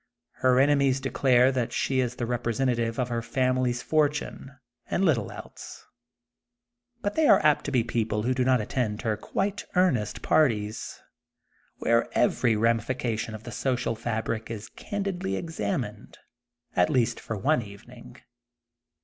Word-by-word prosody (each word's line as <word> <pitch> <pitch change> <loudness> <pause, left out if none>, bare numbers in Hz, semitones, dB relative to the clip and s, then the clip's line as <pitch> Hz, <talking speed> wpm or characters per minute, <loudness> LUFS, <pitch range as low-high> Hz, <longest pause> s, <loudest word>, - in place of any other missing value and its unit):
Her 130 0 +3
enemies 140 -1 +3
de 135 0 -4
clare 130 -1 +4
that 125 -3 -1
she 130 -1 0
is 125 -1 0
the 120 - -3
representative 120 -1 -1
of 125 -1 0
her 120 -1 -1
family 130 +1 +1
fortune, 145 +1 -1 0.3
and 195 - +1
little 145 -9 +1
else. - - -10 1.2
But 205 -1 -1
they 315 -2 +3
are - - +7
apt 150 -1 +3
to - - -3
be 125 -4 +2
people 110 -2 -1
who 125 +3 +1
do 130 0 +1
not 130 0 +3
attend 110 0 -2
her 110 -3 0
quite 195 - -2
earnest 140 - +1
parties, 110 -8 +1 0.8
where 115 0 +2
every 120 -1 +3
ramification 115 0 0
of 110 - -10
the 120 - -8
social 125 -1 -1
fabric 110 0 -3
is 110 -2 -6
candidly 195 - -3
examined, 105 - -4 0.6
at 90 -1 +3
least 120 -3 +1
for 115 - -5
one 140 +6 +2
evening. 115 +3 -13
125 Hz, 145 wpm, -27 LUFS, 115-135 Hz, 1.2 s, are